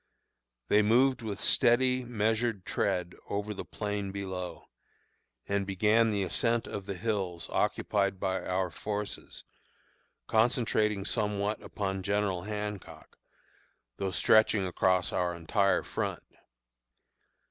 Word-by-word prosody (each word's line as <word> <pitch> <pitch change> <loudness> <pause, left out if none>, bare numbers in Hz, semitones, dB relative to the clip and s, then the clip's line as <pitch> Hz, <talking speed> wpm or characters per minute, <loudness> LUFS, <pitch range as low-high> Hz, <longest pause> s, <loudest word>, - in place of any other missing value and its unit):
They 105 - +5
moved 125 +4 +3
with 105 -3 -4
steady, 125 +2 +3
measured 110 -2 0
tread 90 -1 -1 0.2
over 105 +1 -2
the - - -6
plain 105 -2 -4
below, 95 -2 -5 0.8
and 100 0 0
began 105 +4 +3
the 100 -2 0
ascent 115 +5 0
of 100 -1 -6
the 100 - -3
hills 90 -4 -2
occupied 100 -2 0
by 95 -1 -1
our 90 -1 -1
forces, 105 +4 -5 0.8
concentrating 110 -3 +2
somewhat 105 -1 -1
upon 95 -2 -3
General 100 -2 0
Hancock, 105 0 -6 0.8
though 95 - -1
stretching 110 +1 +4
across 95 0 +1
our 90 -1 0
entire 95 +4 +1
front. - - -3
105 Hz, 110 wpm, -30 LUFS, 95-110 Hz, 0.8 s, They